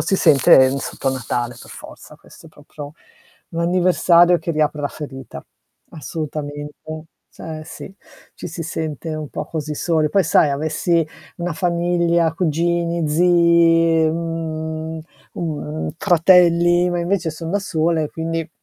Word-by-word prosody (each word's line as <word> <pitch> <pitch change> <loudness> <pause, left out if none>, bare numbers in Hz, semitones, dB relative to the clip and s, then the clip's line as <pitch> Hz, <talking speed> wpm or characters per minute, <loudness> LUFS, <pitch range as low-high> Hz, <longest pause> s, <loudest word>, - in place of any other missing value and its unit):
si 195 - 0
sente 135 -5 +5
sotto 135 0 -3
Natale 120 -1 -3
per - - -13
forza, - - -12
questo - - -17
è - - -13
proprio 145 -1 -11 0.6
un 170 - -4
anniversario 175 0 +4
che 170 - -4
riapre 150 -1 0
la 145 - 0
ferita. 135 -4 -9 0.5
Assolutamente 150 +1 -7 0.3
Eh 155 -1 -7
sì, 190 - -10 0.4
ci - - -8
si 165 +1 -6
sente 160 -1 -5
un 155 -2 -5
po' - - -6
così 155 -2 -4
soli. 155 0 0
Poi, 195 - +3
sai, 155 -1 +3
avessi 160 +3 0 0.3
una 175 0 -3
famiglia, 170 0 +1
cugini, 170 0 0
zii, 165 -1 +4
mhmm, 160 -1 -4 0.3
mhmm, 155 -2 -4
fratelli, 175 -1 +4
ma 175 - -1
invece 175 -1 -1
son 160 +1 -7
da 200 - +1
sola, 165 -4 0
e 150 - -4
quindi 165 0 -4
165 Hz, 135 wpm, -20 LUFS, 155-170 Hz, 0.6 s, sente